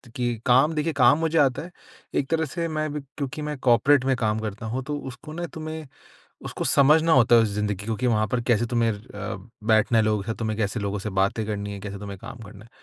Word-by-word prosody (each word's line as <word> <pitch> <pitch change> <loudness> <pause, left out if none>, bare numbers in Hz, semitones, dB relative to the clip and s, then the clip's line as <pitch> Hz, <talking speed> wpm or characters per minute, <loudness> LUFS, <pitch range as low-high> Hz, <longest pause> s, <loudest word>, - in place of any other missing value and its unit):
कि 120 -1 -1
काम 130 +6 +4
देखिए, 155 +1 0
काम 130 0 +5
मुझे 165 0 0
आता 135 -3 +2
है। 175 +2 -9 0.4
एक 135 - +1
तरह 160 0 +1
से 170 +3 -3
मैं 155 -1 -2
अभी 150 0 -3 0.2
क्योंकि 145 +1 -4
मैं 150 -1 -4
कॉर्पोरेट 130 +2 +4
में 135 -1 +2
काम 110 -2 0
करता 110 +1 -5
हूँ, 125 +4 -3
तो 145 +1 -3
उसको 140 +3 -9
ना 175 +1 -4
तुम्हें, 155 -1 -6 0.6
उसको - - -4
समझना 155 +4 +4
होता 120 -2 +5
है, 115 - +7
उस 110 - +1
ज़िंदगी 105 -1 -2
को 110 - -1
कि 125 +4 -1
वहाँ 110 -2 +2
पर 120 +4 -1
कैसे 120 -1 +2
तुम्हें 115 -1 +1
अ, 105 -1 -7 0.3
बैठना 110 +1 +3
है - - +4
लोगों 105 -1 +1
के - - -16
साथ, 115 - -2
तुम्हें 110 -2 -2
कैसे 105 +2 -1
लोगों 100 0 -2
से 105 - -4
बातें 100 +3 +1
करनी 100 -1 -4
है, 100 - -7
कैसे 100 0 -7
तुम्हें 100 -1 -7
काम 135 -3 -9
करना 105 +1 -13
है। - - -21
120 Hz, 250 wpm, -25 LUFS, 105-145 Hz, 0.6 s, है